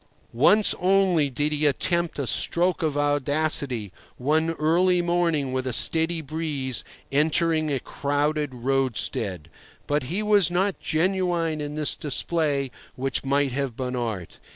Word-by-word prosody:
Once 200 - +4
only 180 -5 +3
did 145 +4 -1
he 150 0 +1
attempt 170 +4 0
a 140 - -2
stroke 175 +8 0
of 155 -3 -1
audacity, 145 - 0 0.3
one 155 +5 +1
early 175 +4 +2
morning, 170 -6 0
with 130 0 -2
a 130 - -2
steady 160 +6 +3
breeze, 145 -4 -3 0.3
entering 155 +2 +1
a 135 - 0
crowded 145 +2 -1
roadstead. 125 - -1 0.4
But 145 -2 -1
he 180 +10 -2
was 205 -4 +4
not 190 +2 0
genuine 170 -2 0
in 145 0 -5
this 150 -1 0
display 145 -2 -1 0.2
which 135 -1 -2
might 140 0 +1
have 135 -2 -3
been 125 -1 -3
art. 110 -8 -4
150 Hz, 135 wpm, -24 LUFS, 135-170 Hz, 0.4 s, Once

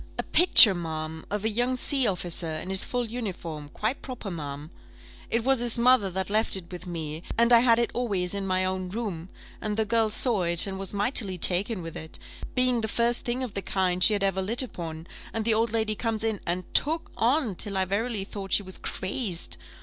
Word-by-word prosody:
"A - - -2
picture, 325 - +7
ma'am, 160 -2 -6
of 210 +1 -3
a - - +2
young 245 +4 0
sea 265 -1 +3
officer, 175 -3 -1
in 155 +3 -5
his 190 0 +4
full 245 -1 -2
uniform 185 -10 -6
quite 220 - -3
proper, 245 -7 -7
ma'am. 145 -1 -7 0.6
It 230 0 0
was 265 0 +3
his 240 -1 +3
mother 235 -4 +4
that 190 +2 -4
left 215 0 +2
it 175 -2 -10
with 180 +1 -9
me, 160 -2 -5 0.2
and 235 +1 +4
I 235 - +8
had 230 -1 +4
it 235 - 0
always 200 -7 -1
in 200 -1 -3
my 185 0 0
own 185 -1 -3
room, 190 -5 -5 0.3
and 210 0 -3
the 220 - +1
girl 225 +1 +2
saw 220 -1 +4
it, 170 -1 +4
and 190 -1 -5
was 195 - -4
mightily 205 -2 0
taken 185 +3 +1
with 165 -1 -8
it, 160 - -5 0.4
being 250 -2 +2
the 220 - -1
first 235 +2 +1
thing 245 +2 -2
of 240 -5 -6
the 200 - -3
kind 185 -2 0
she 215 - +7
had 200 -1 -1
ever 190 -1 0
lit 230 +7 +1
upon, 165 -8 -7 0.3
and 225 -1 -3
the 225 - +3
old 225 +1 +1
lady 220 -1 0
comes 220 0 -2
in, 220 -3 -1
and 180 +1 -4
took 320 +3 +1
on, 245 -1 +1
till 195 +2 -5
I 190 - +1
verily 205 +2 -2
thought 195 0 -6
she 205 - +5
was 185 -1 -6
crazed. 190 -2 -2
205 Hz, 220 wpm, -26 LUFS, 180-235 Hz, 0.6 s, I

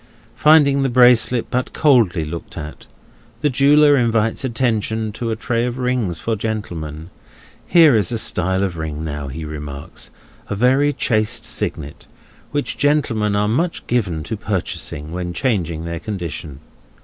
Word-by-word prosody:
Finding 145 -3 +5
the 135 - +1
bracelet 125 -1 +4
but 125 +1 -2
coldly 115 - +3
looked 85 +2 -8
at, 75 -2 -8 0.5
the 150 - +1
jeweller 145 +3 +5
invites 115 -2 +1
attention 110 -3 -1
to 115 +2 -4
a 110 - -1
tray 120 0 -1
of 120 0 -3
rings 125 -9 -1
for 115 +6 -2
gentlemen; 85 -7 -5 0.6
here 160 -7 +6
is 105 -5 +1
a 115 - -1
style 95 -2 +1
of 90 -3 -3
ring, 80 -1 -5
now, 75 -2 -5
he 80 +4 -6
remarks—a 75 +6 -9
very 130 +6 +3
chaste 110 -3 0
signet—which 140 - -5
gentlemen 120 -8 +1
are 105 0 +1
much 165 +11 -1
given 95 -10 -1
to 110 - -4
purchasing, 90 -7 -4
when 90 0 -4
changing 85 - -1
their 85 0 -4
condition. 85 -8 -6
110 Hz, 140 wpm, -19 LUFS, 85-125 Hz, 0.6 s, here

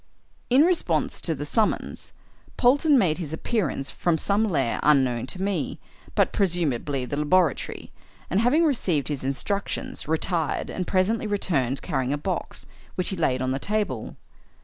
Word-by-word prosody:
In 260 +4 +6
response 350 0 +1
to 165 - -1
the 145 +1 -5
summons, 215 +8 -1 0.5
Polton 285 +4 +4
made 175 -8 +2
his 160 -3 -4
appearance 160 - -2
from 170 -2 0
some 200 +6 +2
lair 135 -9 0
unknown 130 -5 +3
to 185 +8 -6
me, 195 -8 -2 0.4
but - - +2
presumably 150 -8 0
the 145 - -4
laboratory, 160 +1 +1 0.4
and, 190 - +1
having 255 +9 +4
received 180 - 0
his 145 -3 -3
instructions, 145 +10 -3
retired, 160 0 -1
and 185 - -3
presently 205 +4 +1
returned 140 - 0
carrying 135 -5 -1
a - - 0
box, 175 +4 -3 0.3
which 185 - 0
he 190 - -2
laid 130 -7 0
on 130 - 0
the 135 - -1
table. 200 - -2
170 Hz, 150 wpm, -25 LUFS, 140-200 Hz, 0.5 s, In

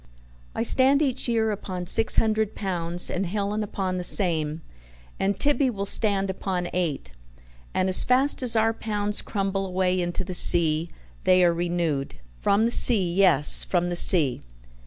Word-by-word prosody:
I - - -1
stand 270 +4 +4
each 265 -3 -1
year 225 -2 0
upon 185 -3 -6
six 225 +5 +1
hundred 220 -1 0
pounds, 175 -3 -2
and 185 +1 -3
Helen 205 +3 -3
upon 190 -3 -4
the 180 - -4
same, 160 -4 0 0.6
and 195 0 -1
Tibby 285 -2 +1
will 200 -4 -5
stand 200 -1 +1
upon 185 -2 -4
eight, 155 - -3 0.6
and 185 - -1
as 185 - +3
fast 265 +3 +1
as 240 -3 0
our 225 0 +1
pounds 210 -2 -3
crumble 195 -1 -3
away 185 -1 -1
into 175 +1 -3
the 185 0 -7
sea 165 -2 +3 0.3
they 185 0 +3
are 170 -1 +3
renewed 170 -5 -3 0.3
from 205 +3 +2
the 235 - 0
sea, 190 -8 +3
yes, 175 -7 +3
from 175 -1 -1
the - - -2
sea. 155 -7 +3
190 Hz, 160 wpm, -24 LUFS, 175-215 Hz, 0.6 s, stand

